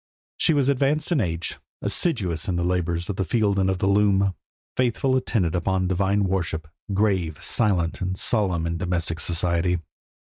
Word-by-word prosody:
She 160 - +3
was 140 -2 +2
advanced 140 +4 +1
in 155 -7 +3
age; 85 -3 -3 0.2
assiduous 95 - -1
in 90 - 0
the 85 - 0
labours 85 -1 -1
of 100 - -4
the 95 - +1
field 100 +1 +1
and 95 0 +2
of 95 - 0
the 95 - -1
loom; 100 0 +4
a 100 -1 0 0.4
faithful 130 +1 +1
attendant 100 -9 0
upon 95 +1 0
divine 100 +2 +1
worship; 90 -4 -1 0.2
grave, 95 -6 +1
silent, 95 -6 +1
and 95 0 -2
solemn 95 -8 +1
in 85 0 -2
domestic 85 -2 -1
society. 85 +1 +1
95 Hz, 170 wpm, -24 LUFS, 85-105 Hz, 0.4 s, loom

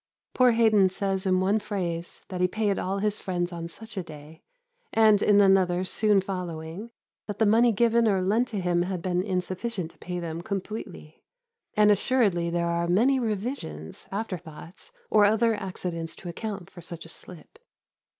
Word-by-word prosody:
Poor 250 -2 +5
Haydon 215 -4 +4
says 190 0 -2
in 185 -1 +3
one 200 +3 +2
phrase 175 -5 -4
that 180 -2 -4
he 180 - +4
paid 205 +1 0
all 190 +2 -2
his 210 +1 -1
friends 175 -2 -2
on 170 -1 -5
such 225 +6 -12
a - - 0
day, 155 0 -12 0.5
and 215 -2 +5
in 205 -1 +5
another 190 -2 +4
soon 210 +2 +3
following 180 +1 -5 0.4
that 205 -1 -5
the 220 - +3
money 230 +3 +5
given 230 +1 +3
or 195 -3 +2
lent 210 +7 +1
to 215 -4 -4
him 175 -1 +1
had 180 -1 -3
been 180 -1 0
insufficient 185 0 -3
to - - -27
pay 180 0 -5
them 165 -1 -5
completely; 195 -5 -6 0.5
and 210 0 +5
assuredly 200 -5 +2
there 170 0 0
are 170 0 0
many 240 +10 +3
revisions, 210 - -4
after 200 -2 -3
thoughts, 160 +3 -12 0.2
or 210 - +6
other 220 +2 +4
accidents 180 -5 -5
to 180 - -11
account 195 0 -5
for 175 - -13
such 165 0 -8
a - - -12
slip. 180 - -11
190 Hz, 175 wpm, -26 LUFS, 175-215 Hz, 0.5 s, or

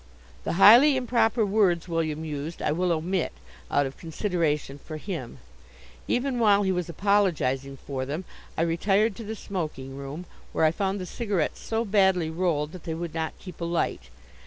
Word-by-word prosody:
The - - -1
highly 240 - +8
improper 235 -2 +2
words 195 -5 +2
William 160 -2 -2
used 150 +2 -5
I - - 0
will 180 +3 +1
omit, 170 +2 -1 0.4
out 145 0 +2
of 135 0 -6
consideration 160 -5 -1
for 155 +2 -7
him. 155 - -6 0.7
Even 250 0 0
while 205 -3 +5
he 190 - +1
was 180 -2 -2
apologizing 155 -8 +1
for 130 0 -4
them 150 +7 -4 0.3
I 165 - +2
retired 195 +6 +2
to 230 - -6
the 220 +1 -5
smoking 155 -10 -5
room, 140 +5 -7 0.3
where - - +3
I 155 - +5
found 195 +3 -1
the 185 - -4
cigarettes 200 -4 -2
so 225 +1 -1
badly 190 -5 +3
rolled 160 -3 0
that 180 -2 -11
they 160 - -3
would 170 -1 -5
not 160 -1 -3
keep 180 -3 -11
alight. 170 - -1
175 Hz, 170 wpm, -26 LUFS, 155-200 Hz, 0.7 s, highly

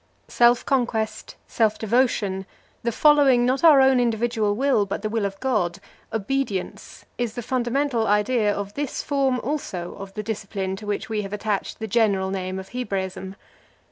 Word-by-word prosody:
Self 240 0 +4
conquest, 240 -5 -1
self 220 -2 +1
devotion, 210 -5 0 0.3
the 235 - -1
following 275 -2 +5
not 260 +3 0
our 300 -5 +8
own 265 -1 +5
individual 230 -3 0
will, 265 -3 +2
but 200 - -4
the 215 - -1
will 225 -2 0
of 195 0 -9
God, 210 -9 0 0.3
obedience, 220 -2 -3
is 235 -2 -2
the 240 - -4
fundamental 250 0 0
idea 210 +1 +2
of 200 0 -4
this 290 -2 -3
form, 270 -3 +1
also, 195 - -4
of 195 0 -9
the 210 - -4
discipline 200 -3 -4
to 210 - -9
which 205 - -2
we 220 -2 -2
have 195 0 -7
attached 210 -1 -2
the 220 - -5
general 200 -3 +1
name 185 -1 -3
of 190 0 -8
Hebraism. 190 -5 -4
220 Hz, 165 wpm, -23 LUFS, 200-250 Hz, 0.3 s, our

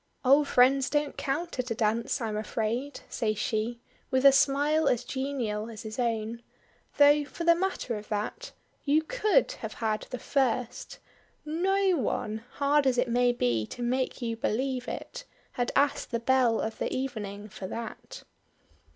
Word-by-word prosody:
"Old 280 +3 +5
friends 260 +1 +4
don't 295 -1 0
count 300 +2 -3
at 250 0 -1
a 230 - -1
dance, 225 +3 0
I'm 220 -2 -2
afraid," 225 +6 -2
says 215 -2 -1
she, 220 +3 -1 0.3
with 260 +1 +1
a 275 - +10
smile 290 +3 +3
as 245 - +2
genial 245 -6 -3
as 220 -2 -9
his 220 +2 -7
own; 230 -1 -1 0.6
"though 290 +1 +6
for 290 +4 -7
the 335 0 +6
matter 345 -9 -2
of 210 - -13
that 215 - -4 0.3
you 305 +2 +3
could - - +2
have - - -5
had 215 -2 -2
the 250 - -4
first; 250 -2 -1 0.5
no 375 +4 +2
one 215 -3 -2
hard 285 0 +2
as 255 -1 +2
it 250 0 +1
may 245 +1 +3
be 120 - 0
to 245 - -6
make 255 +1 -1
you 230 -1 -1
believe 250 +3 -1
it - - -6 0.3
had 245 -1 -1
asked 285 0 +2
the 235 - -1
belle 245 -1 +3
of 220 - -4
the - - -2
evening 210 -6 -4
for 190 -2 -7
that." 235 - -7
250 Hz, 165 wpm, -28 LUFS, 225-285 Hz, 0.6 s, a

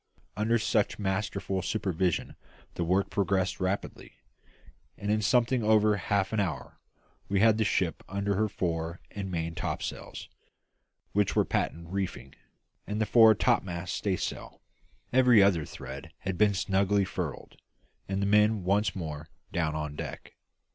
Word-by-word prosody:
Under 110 +3 +2
such 110 -2 +1
masterful 95 -1 -2
supervision 95 -4 -1 0.4
the 85 - -2
work 95 +4 +1
progressed 95 -2 0
rapidly, 95 +1 -3 0.8
and 105 +1 -2
in 110 0 +2
something 120 +3 +2
over 105 -1 +4
half 100 0 0
an 110 - +1
hour 90 -8 -3 0.5
we 100 -1 +2
had 110 +1 +4
the - - +4
ship 95 -5 0
under 100 +1 -1
her 105 +2 +1
fore 85 -2 -3
and 100 -2 -5
main 85 -2 -3
topsails - - -5 0.8
(which 105 -1 +1
were - - +3
patent 85 0 -2
reefing) 95 -8 -4 0.5
and 105 +1 -2
the 110 - +2
fore 110 -1 +7
topmast 90 -2 0
staysail; 95 -4 -3 0.5
every 125 -5 +6
other 90 -6 +3
thread 65 +1 -9 0.2
being 100 +2 +3
snugly 100 +1 +2
furled, 90 -6 -6 0.5
and 95 0 -1
the - - +1
men 105 0 +3
once 100 +1 +1
more 80 -4 -6 0.2
down 80 -3 -1
on 75 -1 -4
deck. - - -7
100 Hz, 140 wpm, -29 LUFS, 90-105 Hz, 0.8 s, fore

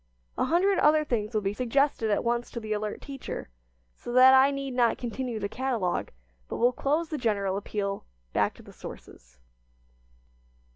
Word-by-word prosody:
A - - +1
hundred 375 +3 +3
other 305 +1 +5
things 225 -7 -2
will 215 - +2
be 195 +1 0
suggested 255 0 +1
at 205 - +1
once 240 0 -1
to 235 - -5
the 215 -1 -3
alert 210 0 -3
teacher, 275 - -6 0.5
so - - -8
that 255 +1 +8
I 265 +1 +7
need 275 -1 -4
not 240 -2 +2
continue 240 -1 -4
the 200 - -2
catalogue, 225 -5 -1 0.4
but - - -5
will 245 +2 +3
close 305 +6 0
the 305 - -3
general 200 -5 0
appeal 200 0 -3 0.3
"Back - - +1
to - - -15
the - - -14
Sources." 60 +1 -12
240 Hz, 175 wpm, -28 LUFS, 210-275 Hz, 0.5 s, that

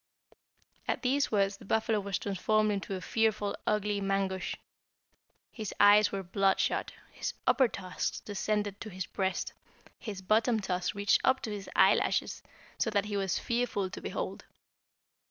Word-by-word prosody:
"At - - -1
these 270 +2 +2
words 195 -2 +2
the - - -14
buffalo 220 +1 +1
was 200 -1 -2
transformed 215 +2 +1
into 195 -1 -3
a 185 - -5
fearful 215 -2 0
ugly 210 -1 +1
Mangusch. 195 -1 -1 1.0
His 215 -4 -6
eyes 205 +1 +7
were 195 -1 -3
bloodshot, 195 +2 +1 0.2
his - - -4
upper 260 - +5
tusks 185 -5 -4
descended 205 0 -2
to 220 - -6
his 185 -2 -5
breast, 190 -1 -2 0.5
his 200 -5 -6
bottom 220 +3 +3
tusks 185 -1 -2
reached 205 0 +3
up 260 0 +4
to 220 - -4
his 205 -2 -6
eyelashes, - - +3 0.4
so - - +2
that 205 -2 +1
he 210 -1 -4
was 195 -2 0
fearful 235 -6 -1
to - - -7
behold. - - -4
205 Hz, 150 wpm, -30 LUFS, 195-215 Hz, 1.0 s, eyes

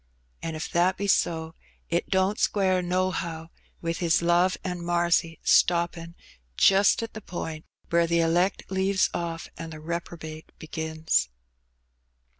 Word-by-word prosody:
An' 165 -1 -4
if 155 - -4
that 175 +2 +2
be 200 - -2
so, 160 -4 +1 0.3
it 170 0 -1
don't 190 +2 +1
square 190 -3 +2
nohow 175 -2 -2 0.3
with 165 0 -2
His 170 -1 +2
love 175 +2 +3
an' 180 -2 -4
marcy 170 -1 +1
stoppin' 170 -1 +2 0.4
just 195 +3 +5
at 225 - -6
the 215 - -7
point 160 -4 -6 0.3
where 170 0 +3
the 170 0 +2
elect 175 +3 +2
leaves 190 0 +2
oflF 165 -1 -4
an' 165 0 -6
the 160 - -8
repro 170 +2 -5
bate 155 0 -9
begins." 160 - -1
170 Hz, 140 wpm, -26 LUFS, 165-185 Hz, 0.4 s, just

